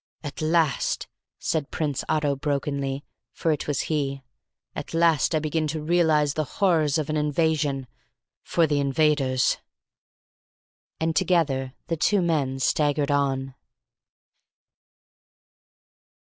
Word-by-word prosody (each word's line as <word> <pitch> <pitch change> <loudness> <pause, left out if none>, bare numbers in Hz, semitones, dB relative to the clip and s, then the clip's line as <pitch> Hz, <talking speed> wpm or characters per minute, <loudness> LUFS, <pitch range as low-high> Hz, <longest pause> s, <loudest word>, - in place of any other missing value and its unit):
"At 145 0 -6
last," 160 -2 +1 0.3
said 155 -4 -2
Prince 145 -4 -2
Otto 150 -2 +1
brokenly, 140 -1 -2 0.3
for 165 - 0
it 150 - -2
was 145 -3 0
he, 140 -3 -2 0.5
"at - - -6
last 165 -1 +3
I - - +3
begin 155 +1 -1
to 155 +1 -3
realise 155 -3 +3
the 155 - 0
horrors 165 -7 +3
of 155 -2 -1
an 155 - 0
invasion 150 -2 0 0.6
for 170 - +2
the 145 -2 +1
invaders." 140 -2 +2 1.4
And 160 0 0
together 140 -6 +1
the 165 - -2
two 200 +4 +2
men 145 -6 0
staggered 145 +1 +1
on. 135 -2 0
150 Hz, 115 wpm, -25 LUFS, 140-160 Hz, 1.4 s, last